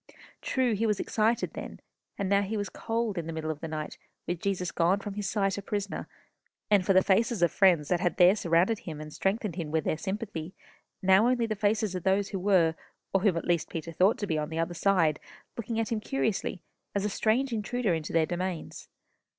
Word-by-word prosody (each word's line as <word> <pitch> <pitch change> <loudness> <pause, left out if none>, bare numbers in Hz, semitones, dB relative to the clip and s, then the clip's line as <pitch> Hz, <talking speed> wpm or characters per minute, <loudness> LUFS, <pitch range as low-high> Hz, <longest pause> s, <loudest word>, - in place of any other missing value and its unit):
True, 255 -3 +1
he 220 +2 0
was 210 -2 +1
excited 225 +2 0
then, - - -7 0.4
and 200 - -1
now 200 +1 +3
he 210 +2 -2
was 205 -1 -2
cold 225 -4 -2
in 165 - -5
the - - -3
middle 160 -1 -3
of 150 - -7
the 165 - -5
night, 155 -1 -5 0.3
with 175 0 -3
Jesus 185 -3 -1
gone 180 +4 +2
from 205 0 -6
his 205 -2 -3
sight 195 -2 0
a - - -6
prisoner, 200 0 -4 0.6
and 200 -3 +5
for 195 - +3
the 185 0 +5
faces 215 0 +2
of 170 - +4
friends 175 -7 +4
that 180 - +2
had 175 -1 0
there 180 +2 +7
surrounded 180 +3 +2
him 155 -3 -7
and 155 0 -8
strengthened 195 -2 -1
him 165 -4 -3
with 160 +1 0
their 155 - -1
sympathy, 190 -4 -5 0.5
now 190 +4 +5
only 245 -2 +2
the 220 -1 -2
faces 210 -1 +1
of 185 - -3
those 195 +3 +1
who 195 - -3
were, 180 -4 +3 0.4
or 195 - +3
whom 190 -4 +3
at 165 - -3
least 170 -2 +1
Peter 165 0 -5
thought 185 +6 +3
to 205 - -2
be 160 -5 -1
on 150 - -3
the 160 - -5
other 165 +1 -1
side, 165 -3 +2 0.4
looking 230 0 -3
at 225 -1 -1
him 225 - 0
curiously, 215 -6 -2 0.3
as 200 0 0
a - - +2
strange 235 +5 +1
intruder 225 -1 0
into 160 -2 -3
their 165 -1 +3
domains. 180 0 -4
195 Hz, 225 wpm, -28 LUFS, 170-215 Hz, 0.6 s, there